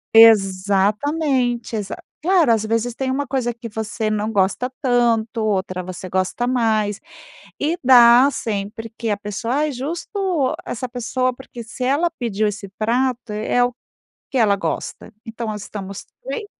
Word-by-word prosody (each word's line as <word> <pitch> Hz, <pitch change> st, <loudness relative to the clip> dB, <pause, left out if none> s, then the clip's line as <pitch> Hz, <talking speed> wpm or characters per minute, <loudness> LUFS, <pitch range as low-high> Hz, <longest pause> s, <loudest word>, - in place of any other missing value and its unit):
Exatamente, 225 Hz, +6 st, +3 dB
exa 205 Hz, -2 st, -3 dB, 0.3 s
claro, 340 Hz, -5 st, +4 dB
às 220 Hz, -1 st, 0 dB
vezes, 230 Hz, +2 st, -1 dB
tem 265 Hz, +1 st, -2 dB
uma 280 Hz, +2 st, -1 dB
coisa 255 Hz, -2 st, -1 dB
que 235 Hz, 0 st, -8 dB
você 220 Hz, 0 st, -3 dB
não 215 Hz, +1 st, -1 dB
gosta 200 Hz, +5 st, +1 dB
tanto, 235 Hz, -3 st, +1 dB
outra 185 Hz, -3 st, -1 dB
você 185 Hz, +1 st, -7 dB
gosta 185 Hz, +6 st, -1 dB
mais, 220 Hz, -4 st, +1 dB, 0.6 s
e 315 Hz, +4 st, 0 dB
dá 245 Hz, +1 st, +8 dB
sempre 220 Hz, -2 st, -4 dB
que 230 Hz, -1 st, -3 dB
a 205 Hz, -, +1 dB
pessoa 210 Hz, +4 st, -3 dB
aí 305 Hz, 0 st, +1 dB
justo 330 Hz, -, -2 dB
essa 250 Hz, +1 st, -4 dB
pessoa. 255 Hz, +1 st, -1 dB
Porque, 245 Hz, -2 st, -10 dB
se 240 Hz, +3 st, -7 dB
ela 295 Hz, +6 st, +2 dB
pediu 215 Hz, -3 st, -1 dB
esse 205 Hz, -1 st, -5 dB
prato, 240 Hz, +1 st, 0 dB
é 215 Hz, +3 st, +1 dB
o 245 Hz, 0 st, 0 dB, 0.6 s
que 270 Hz, -, -4 dB
ela 215 Hz, -5 st, +4 dB
gosta, 200 Hz, -, -4 dB
então, 225 Hz, -1 st, -5 dB
estamos 200 Hz, -1 st, -7 dB, 0.2 s
bem. 470 Hz, -3 st, -4 dB
230 Hz, 150 wpm, -21 LUFS, 210-255 Hz, 0.6 s, dá